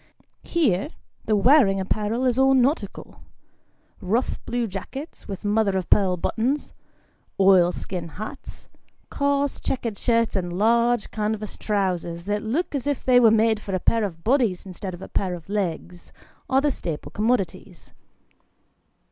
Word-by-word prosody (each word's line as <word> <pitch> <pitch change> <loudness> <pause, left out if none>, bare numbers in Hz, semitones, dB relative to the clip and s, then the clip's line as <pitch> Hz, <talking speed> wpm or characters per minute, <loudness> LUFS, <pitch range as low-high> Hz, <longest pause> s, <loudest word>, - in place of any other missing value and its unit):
Here, 285 - 0 0.4
the 215 - +2
wearing 205 -2 +5
apparel 215 +5 -1
is 250 0 +2
all 270 0 +5
nautical. 265 +5 -1 0.8
Rough 220 +7 -1
blue 240 0 -1
jackets, 225 - -7
with 195 +1 -7
mother 205 -2 +2
of 185 - -4
pearl 185 -3 +4
buttons, 245 - -1 0.7
oil 190 -2 +5
skin 180 -2 -5
hats, 215 - -9 0.4
coarse 280 0 0
checked 230 -6 -3
shirts, 230 -2 +1
and 175 -2 -2
large 235 +2 +2
canvas 215 -1 -3
trousers 180 -5 -2
that 205 +2 -2
look 280 +12 -2
as 280 -1 -3
if 285 -2 -2
they 250 -1 +6
were 235 -2 +6
made 220 0 +3
for 195 -2 -4
a - - 0
pair 225 +5 +2
of 165 -5 -5
bodies 230 -8 +1
instead 185 0 -6
of 175 - -11
a - - -7
pair 185 -2 -1
of 170 - -12
legs, 180 -3 -4 0.4
are 265 0 +3
the 295 0 +2
staple 165 - -5
commodities. 215 -2 -2
215 Hz, 150 wpm, -24 LUFS, 190-245 Hz, 0.8 s, they